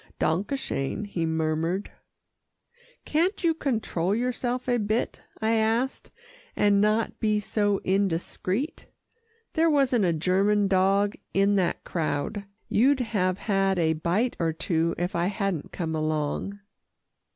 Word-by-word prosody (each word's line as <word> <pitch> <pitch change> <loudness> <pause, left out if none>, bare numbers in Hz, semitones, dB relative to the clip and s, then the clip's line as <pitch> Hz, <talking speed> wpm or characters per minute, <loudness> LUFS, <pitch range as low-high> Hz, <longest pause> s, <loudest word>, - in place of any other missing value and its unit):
"Danke 170 +6 +1
schön," 210 - -2
he 170 -5 -2
murmured. 160 +4 -1 1.1
"Can't 350 +6 +1
you 335 -1 +4
control 215 - -1
yourself 250 +1 -2
a 245 -1 +2
bit?" 215 +2 -1 0.2
I 220 0 +1
asked, 225 +4 0 0.5
"and 205 -1 +4
not 215 +1 +1
be 215 -1 +2
so 205 -1 0
indiscreet? 195 - -1 0.7
There 325 0 +3
wasn't 265 -8 +3
a 175 - +3
German 195 +5 +2
dog 195 +2 +3 0.2
in 200 +1 +4
that 180 -3 0
crowd. 170 +5 -2 0.2
You'd 265 +5 +3
have 195 -6 0
had 195 -2 +1
a 160 -2 +2
bite 175 +10 0
or 165 -1 +1
two, 165 0 0
if 175 +2 -2
I 170 +1 +1
hadn't 195 -5 -2
come 160 -3 -3
along." 155 +5 -2
200 Hz, 130 wpm, -26 LUFS, 170-225 Hz, 1.1 s, you